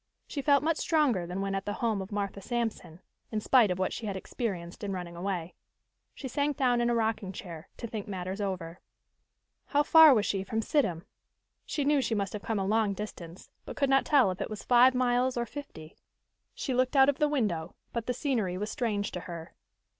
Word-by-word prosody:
She 285 - -4
felt 280 0 +4
much 325 0 +1
stronger 275 - +1
than 180 +2 -4
when 195 0 -2
at 195 0 -2
the 205 - -1
home 220 -2 -1
of 190 - -8
Martha 200 -1 -3
Sampson, 225 -7 -3 0.3
in 215 - -1
spite 230 0 +4
of 180 - -1
what 185 0 -1
she 225 - -5
had 200 - -3
experienced 190 -3 -5
in 200 - -2
running 175 -2 -6
away. 180 -1 -3 0.6
She 270 - -6
sank 285 +2 -1
down 245 -3 +2
in 240 - +2
a 240 - +2
rocking 220 -4 -1
chair, 170 -4 -9
to - - -6
think 220 -3 -5
matters 190 0 -4
over. 185 -3 -4 0.9
How 290 0 +2
far 320 -2 +8
was 215 -2 +2
she 195 -1 -1
from 225 +3 -2
Sidham? 185 - 0 0.6
She 290 - -1
knew 290 -1 +3
she 230 -2 -1
must 200 -2 -2
have 210 - -5
come 225 0 -2
a 195 - -1
long 210 0 +1
distance, 185 -4 -8
but - - -9
could 275 -2 +1
not 270 - +5
tell 270 -10 +4
if 185 - -6
it - - -3
was 215 -1 -7
five 250 +1 +5
miles 250 0 +1
or 240 - 0
fifty. 210 - -10 0.6
She 265 - -3
looked 255 +3 +1
out 270 -1 +7
of 285 -1 +1
the 300 -1 +3
window, 195 - -1 0.2
but 235 -1 -3
the 250 - +1
scenery 230 - -1
was 210 +3 -3
strange 210 -4 -1
to 180 - -4
her. 170 -2 -8
215 Hz, 215 wpm, -29 LUFS, 190-255 Hz, 0.9 s, far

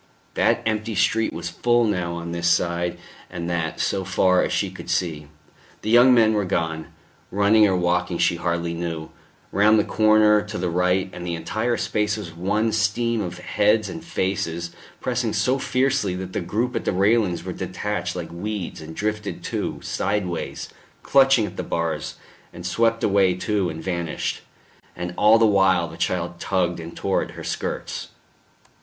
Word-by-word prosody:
That - - +2
empty 110 0 -1
street 110 +4 +2
was 85 +1 -5
full 120 +6 +2
now 90 -6 -1
on 85 0 -5
this 85 0 0
side 85 0 +1 0.3
and 85 -2 -5
that 80 -2 -2
so 95 - 0
far 95 0 +3
as - - -2
she 100 -2 0
could 95 -2 -10
see; 85 -4 -1 0.6
the 110 - -1
young 120 +2 +7
men 115 -3 +5
were 105 -1 +1
gone 80 -3 -2 0.4
running 105 +2 +4
or 95 - +1
walking 90 0 0
she 85 - +2
hardly 85 -1 -1
knew 85 -2 -4 0.4
round 105 +2 +5
the - - +4
corner 110 -1 +4
to 105 0 -6
the 90 -1 -1
right, 90 +2 +1
and 90 - -7
the 85 -1 -2
entire 110 +9 -1
space 105 0 0
was 90 -6 -7
one 105 +6 0
stream 110 +2 +1
of 90 -3 -5
heads 105 +4 +1
and 165 -1 -7
faces, 95 - -2 0.3
pressing - - -1
so 130 +2 +1
fiercely 130 -8 +1
that 95 0 -6
the - - -1
group 115 +8 -2
at 115 - -1
the - - +1
railings 100 -1 +2
were - - -5
detached - - -3
like - - -5
weeds 95 0 -5
and 80 +1 -9
drifted 105 +2 -3
too, - - -3
sideways, 95 -3 -2 0.3
clutching 135 -4 +5
at 90 -2 -8
the - - -2
bars, 85 -1 -2 0.4
and 85 - -10
swept 115 +4 +1
away 95 -3 +3
too 95 0 0
and 80 0 -7
vanished. 85 -3 -3 0.5
And 90 0 -5
all 105 +2 +6
the 115 - +4
while 95 -4 +3
the - - -10
child 85 -1 -2
tugged 90 -3 0
and 85 +1 -9
tore - - 0
at - - -5
her - - -7
skirts. - - -4
95 Hz, 175 wpm, -23 LUFS, 85-110 Hz, 0.6 s, young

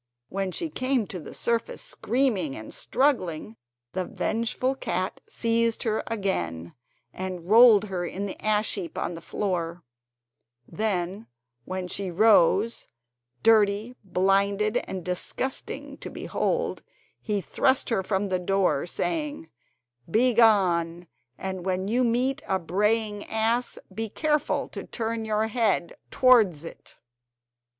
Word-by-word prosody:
When 195 0 -2
she 325 - -3
came 255 -4 0
to 185 - -5
the - - -9
surface 235 - -1
screaming 240 - 0
and 110 - -8
struggling, 220 - 0 0.4
the 185 - -1
vengeful 230 +7 -1
cat 190 -8 -3
seized 230 0 0
her 220 -2 0
again 85 - -2 0.4
and 185 -2 -5
rolled 220 -1 +8
her 185 -3 -3
in 190 +3 -4
the 195 - -7
ash 215 0 +2
heap 180 -5 -5
on - - -2
the 165 - -8
floor; 175 -3 -3 0.8
then 200 -1 -2 0.4
when 185 -1 -4
she 190 +1 -2
rose, 210 +3 +4 0.6
dirty, 215 +1 +3
blinded, 200 +3 +2
and 185 -3 -5
disgusting 185 +8 -4
to - - -7
behold, - - -2 0.4
he 210 -2 -1
thrust 260 - +1
her 225 -5 +1
from 195 +1 -1
the 185 -1 0
door, 180 -4 +1
saying: 300 - -3 0.6
"Begone, 195 -7 +3 0.3
and 190 -1 -4
when 185 0 -1
you 245 +4 +2
meet 255 +4 +1
a 190 - +2
braying 210 +4 0
ass 225 +3 0 0.2
be 225 0 -3
careful 300 +5 0
to - - -7
turn 225 0 -3
your 215 0 +1
head 220 -6 0 0.2
towards 215 - +4
it." - - -11
205 Hz, 125 wpm, -26 LUFS, 185-230 Hz, 0.8 s, rolled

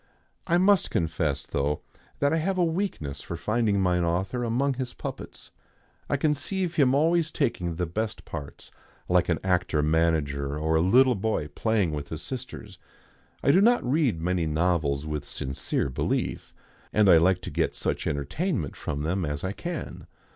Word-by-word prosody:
I 175 -1 +3
must 195 +2 +4
confess, 80 -4 -1
though, 70 +1 -1 0.4
that 145 +2 +2
I - - +3
have 185 +4 0
a 180 - +3
weakness 165 - -2
for 85 - -6
finding 105 +1 +1
mine 90 -2 +2
author 95 +9 -1
among 125 +4 +1
his 130 -1 -5
puppets. - - -7 0.6
I 145 - +2
conceive 160 +5 0
him 135 -4 +3
always 165 +2 +3
taking 95 - -1
the 90 +1 -1
best 110 +6 -4
parts, 70 -3 -8 0.4
like 90 -1 +2
an 85 - +2
actor 90 -5 +1
manager 75 -3 +1
or 80 +1 0
a 80 - +4
little 125 +9 +5
boy 100 -7 -1
playing 105 +2 0
with 75 -1 -5
his 80 0 -5
sisters. 120 -6 -7 0.6
I - - +5
do 185 - +5
not 235 - +4
read 130 - +2
many 85 0 0
novels 75 -3 +1
with 75 -2 -3
sincere 65 +1 -2
belief, - - -2 0.4
and 105 -1 +4
I 90 -3 +8
like 90 +2 +3
to - - -5
get - - 0
such - - -2
entertainment 80 - -2
from 70 +1 -4
them 90 +4 -1
as 75 -2 -3
I 95 - -1
can. 170 - -6
95 Hz, 170 wpm, -26 LUFS, -, 0.6 s, I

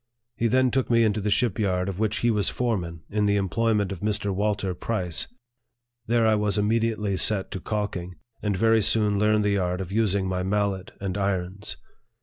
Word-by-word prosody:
He 115 - +1
then 130 +2 +3
took 130 -2 0
me 115 -1 +4
into 110 -1 +1
the 105 - -1
ship 110 0 +1
yard 90 -3 0
of 95 -1 -4
which 110 0 0
he 120 - +3
was 105 -2 +1
foreman, 90 -10 -2
in 105 0 +1
the 100 - +2
employ 110 +4 +1
ment 100 -2 0
of 95 - -5
Mr. 105 -1 -1
Walter 100 -1 -1
Price. 90 -3 -1 0.8
There 115 0 +3
I 110 - +4
was 105 -1 +1
immediately 105 -1 0
set 95 0 +2
to 95 - -4
calking, 95 -3 -4 0.3
and 105 -3 -1
very 115 +2 +4
soon 105 -1 +2
learned 105 0 +3
the 100 -1 +2
art 90 0 -1
of 95 -1 -5
using 100 -3 +1
my 90 0 -1
mallet 95 -1 -1
and 95 0 -3
irons. 95 0 -3
105 Hz, 195 wpm, -25 LUFS, 95-110 Hz, 0.8 s, me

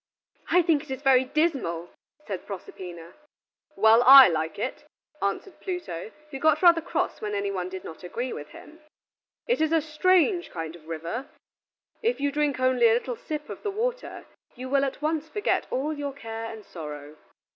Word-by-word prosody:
"I 360 0 +5
think 320 -4 +2
it 295 - -15
is 265 +2 -5
very 260 -2 +5
dismal," 260 - -1 0.3
said 190 -3 -6
Proserpina. 175 -3 -9 0.6
"Well, 220 +2 +6
I 265 -2 +10
like 160 -1 -2
it," 205 - -4 0.3
answered 200 - -3
Pluto, 345 - -5 0.2
who 270 - -6
got 315 +3 +3
rather 340 -2 +7
cross 330 - -2
when 210 -1 -3
any 200 0 -1
one 185 -2 -3
did 190 0 -7
not 160 - -9
agree 240 +8 -4
with 145 - -7
him. 320 - -14 0.7
"It 485 -6 +1
is 315 0 +2
a 325 - +4
strange 350 +4 +2
kind 165 -1 -6
of 160 -2 -16
river. 165 - -5 0.7
If 470 +2 0
you 285 0 0
drink 290 -2 0
only 255 -2 +4
a - - +4
little 245 +1 -1
sip 300 +4 -6
of - - -8
the 415 - -2
water, 475 +5 -3 0.3
you 255 +1 -7
will 275 0 +3
at 275 +2 -5
once 315 0 -1
forget 415 +5 0
all 290 +4 -1
your 290 -2 -4
care 225 -4 -6
and 220 -2 -10
sorrow. 150 -2 -9
260 Hz, 180 wpm, -26 LUFS, 190-310 Hz, 0.7 s, I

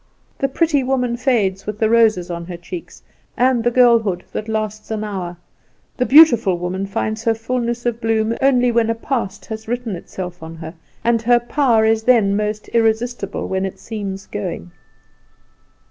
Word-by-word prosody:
The 275 - +1
pretty 295 +1 +1
woman 250 -2 0
fades 210 -7 0
with 210 -1 -3
the 220 - +2
roses 215 -6 +3
on 170 0 -5
her 180 -2 -6
cheeks, 175 0 -9 0.3
and 250 -1 +2
the 240 - +3
girlhood 230 -7 +3
that 215 - -5
lasts 215 -1 -3
an 215 -1 -3
hour; 185 -4 -5 0.6
the 250 - 0
beautiful 240 - +6
woman 185 +3 -3
finds 215 +2 -3
her 225 -1 +3
fullness 240 +1 -3
of 235 -1 -1
bloom 225 0 +1
only 250 -2 +3
when 230 -1 +2
a 230 - +1
past 230 -4 -3
has 220 0 -7
written 240 -3 -3
itself 180 0 -7
on 160 0 -8
her, 160 0 -8 0.3
and 230 -1 +2
her 240 +1 +4
power 240 -2 +2
is 220 0 +2
then 220 -4 +3
most 210 0 -2
irresistible 225 -2 0
when 190 0 -1
it 195 - -4
seems 200 -3 -6
going. 180 -3 -5
220 Hz, 170 wpm, -19 LUFS, 195-240 Hz, 0.6 s, beautiful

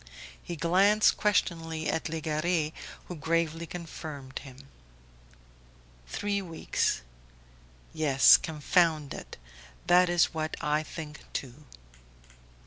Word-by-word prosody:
He 175 - -6
glanced 195 +6 +4
questioningly 165 -6 0
at 160 - -1
Legare 160 0 -1 0.3
who 180 - -7
gravely 165 +1 -1
confirmed 155 -6 -7
him. 135 0 -13 1.4
"Three 200 - -2
weeks... 165 - -1 0.9
Yes, 140 -4 +6
confound 155 -1 +1
it! - - -9 0.5
That 180 0 +5
is 175 0 +3
what 155 0 -3
I 150 -1 +1
think 150 -1 -8
too." 135 +3 -6
160 Hz, 95 wpm, -29 LUFS, 150-175 Hz, 1.4 s, Yes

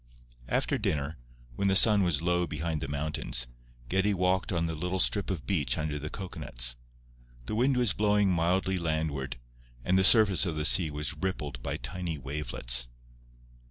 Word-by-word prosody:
After - - 0
dinner, 75 -1 -2 0.4
when 100 - 0
the 95 - +2
sun 105 0 +6
was 85 -4 0
low 90 0 +1
behind 80 0 -3
the - - -3
mountains, 70 -4 -2 0.4
Geddie 95 +5 +1
walked 90 +2 0
on 85 -2 0
the 80 - -3
little 90 +4 -3
strip 100 +1 +2
of 90 -8 -4
beach 85 -8 0
under 75 -1 -3
the 75 +1 -5
cocoanuts. - - -3 0.7
The - - -5
wind 125 +4 +2
was 120 -6 +3
blowing 105 -1 +2
mildly 90 +2 +1
landward, 80 -5 -2 0.5
and 95 +1 +3
the - - +3
surface 100 -2 +6
of 80 - -3
the 75 0 -2
sea 60 +4 +4
was 75 +1 -4
rippled 75 -9 -4
by - - -3
tiny 90 -3 -5
wavelets. 65 -3 -1
85 Hz, 165 wpm, -29 LUFS, 75-95 Hz, 0.7 s, sun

